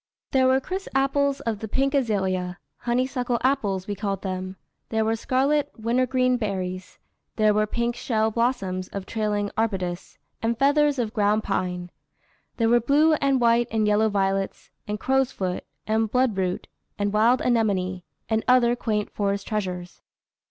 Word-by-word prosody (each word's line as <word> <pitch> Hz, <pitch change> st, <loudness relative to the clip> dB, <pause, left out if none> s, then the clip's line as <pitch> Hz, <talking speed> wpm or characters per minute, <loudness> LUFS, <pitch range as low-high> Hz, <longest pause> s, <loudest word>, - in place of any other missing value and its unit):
There 260 Hz, -1 st, +4 dB
were 260 Hz, -, +4 dB
the -, -, -19 dB
crisp 380 Hz, +1 st, -4 dB
apples 275 Hz, +1 st, +1 dB
of 225 Hz, -3 st, -2 dB
the 220 Hz, -, -5 dB
pink 270 Hz, +6 st, 0 dB
azalea, 190 Hz, -8 st, 0 dB, 0.2 s
honeysuckle 245 Hz, 0 st, 0 dB
apples, 210 Hz, -9 st, +1 dB
we 205 Hz, -, -3 dB
called 200 Hz, -1 st, -3 dB
them; 185 Hz, 0 st, -4 dB, 0.3 s
there 220 Hz, -1 st, +1 dB
were 225 Hz, +1 st, +1 dB
scarlet 280 Hz, +5 st, +1 dB
wintergreen 255 Hz, +2 st, +1 dB
berries; 185 Hz, -4 st, -4 dB, 0.4 s
there 215 Hz, -1 st, +3 dB
were 215 Hz, 0 st, +2 dB
pink 235 Hz, +2 st, -1 dB
shell 220 Hz, -2 st, 0 dB
blossoms 195 Hz, -6 st, -1 dB
of 200 Hz, -1 st, -6 dB
trailing 210 Hz, -1 st, -1 dB
arbutus, 185 Hz, -6 st, -2 dB, 0.2 s
and 230 Hz, +1 st, 0 dB
feathers 285 Hz, +2 st, +3 dB
of 225 Hz, -3 st, -2 dB
ground 210 Hz, 0 st, +2 dB
pine; 180 Hz, -2 st, -2 dB, 0.7 s
there 230 Hz, -, +2 dB
were 240 Hz, +1 st, +5 dB
blue 290 Hz, +7 st, +4 dB
and 275 Hz, -2 st, +3 dB
white 235 Hz, 0 st, +3 dB
and 220 Hz, -1 st, +1 dB
yellow 210 Hz, +1 st, +3 dB
violets, 195 Hz, -1 st, -1 dB, 0.2 s
and 210 Hz, 0 st, -3 dB
crowsfoot, 260 Hz, -9 st, 0 dB, 0.2 s
and 220 Hz, 0 st, +1 dB
bloodroot, 200 Hz, -8 st, 0 dB, 0.3 s
and 205 Hz, 0 st, -1 dB
wild 230 Hz, +4 st, +4 dB
anemone, 195 Hz, -6 st, +1 dB, 0.3 s
and 220 Hz, 0 st, 0 dB
other 245 Hz, -1 st, +5 dB
quaint 210 Hz, -3 st, -2 dB
forest 200 Hz, -1 st, -2 dB
treasures." 185 Hz, -4 st, -4 dB
220 Hz, 150 wpm, -25 LUFS, 195-255 Hz, 0.7 s, were